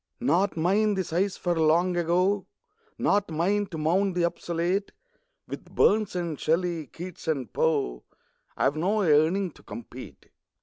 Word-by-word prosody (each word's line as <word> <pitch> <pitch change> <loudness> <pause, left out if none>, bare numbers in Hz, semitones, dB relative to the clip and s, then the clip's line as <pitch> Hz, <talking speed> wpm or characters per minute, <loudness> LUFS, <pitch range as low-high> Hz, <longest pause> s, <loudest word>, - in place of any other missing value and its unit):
Not 200 -6 +1
mine 200 +6 +2
the 190 - 0
sighs 185 +4 -1
for 175 -1 -1
Long 170 +3 +3
Ago; 180 +4 +1 0.5
Not 205 -2 +1
mine 195 +6 0
to 175 -4 -7
mourn 180 +5 +1
the 175 -1 +1
obsolete; 175 +3 -2 0.5
With - - -7
Burns 210 -2 +3
and 170 -4 -3
Shelley, 165 -1 0
Keats 175 +5 -9
and 135 -9 -2
Poe 140 - 0 0.5
I - - 0
have 140 - +2
no 200 +7 +1
yearning 165 +4 +3
to - - -19
compete. 120 +2 -10
175 Hz, 145 wpm, -26 LUFS, 160-195 Hz, 0.5 s, Long